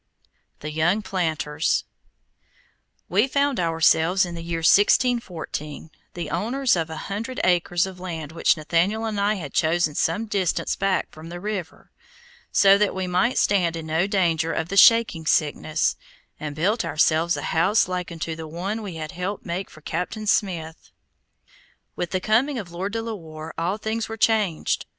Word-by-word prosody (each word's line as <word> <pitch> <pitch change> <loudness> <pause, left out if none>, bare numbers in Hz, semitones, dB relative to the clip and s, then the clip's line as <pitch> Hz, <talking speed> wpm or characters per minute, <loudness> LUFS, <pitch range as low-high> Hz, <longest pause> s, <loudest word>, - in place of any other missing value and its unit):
THE 155 - -5
YOUNG 170 +7 +1
PLANTERS 160 -5 -1 1.2
We 205 +8 +2
found 280 -2 +1
ourselves, 165 +2 +3
in 175 - -7
the 170 - -6
year 165 0 -3
1614, 180 - +1 0.2
the 170 -4 -5
owners 240 +7 +1
of 165 -2 -2
an 160 - -6
hundred 225 +6 -5
acres 175 0 +2
of 190 -1 -9
land 165 -5 -6
which 165 +1 +2
Nathaniel 170 +8 0
and 215 -2 -2
I 205 +1 +2
had 155 -8 -7
chosen 160 -1 +2
some 165 +9 0
distance 195 -5 -1
back 195 -1 0
from 160 +1 -11
the 175 +1 -7
river, 200 -3 -6 0.6
so 200 0 +6
that 210 -2 +1
we 190 0 -2
might 185 +7 +1
stand 175 -5 +2
in 165 -1 -6
no 160 +4 +1
danger 165 -5 +1
of 160 +1 -2
the 195 - -3
shaking 205 -7 +5
sickness, 155 +1 +1 0.4
and 150 -1 -5
built 200 +9 +1
ourselves 160 +1 +2
a - - -5
house 190 +7 +3
like 180 -1 -3
unto 165 -1 -4
the 160 0 -7
one 190 +8 -4
we 195 -5 -6
had 155 0 -5
helped 180 +3 -4
make 185 +2 -4
for 155 - -15
Captain 180 +8 -4
Smith. 170 -6 -1 1.1
With 175 - -3
the 185 - -1
coming 240 +8 +1
of 190 -7 -6
Lord 190 +4 -4
De 225 0 -2
la 230 0 -4
Warr 160 -4 -9
all 175 +5 -1
things 220 +1 -3
were 225 - -5
changed. 210 -7 +1
180 Hz, 170 wpm, -24 LUFS, 160-205 Hz, 1.2 s, so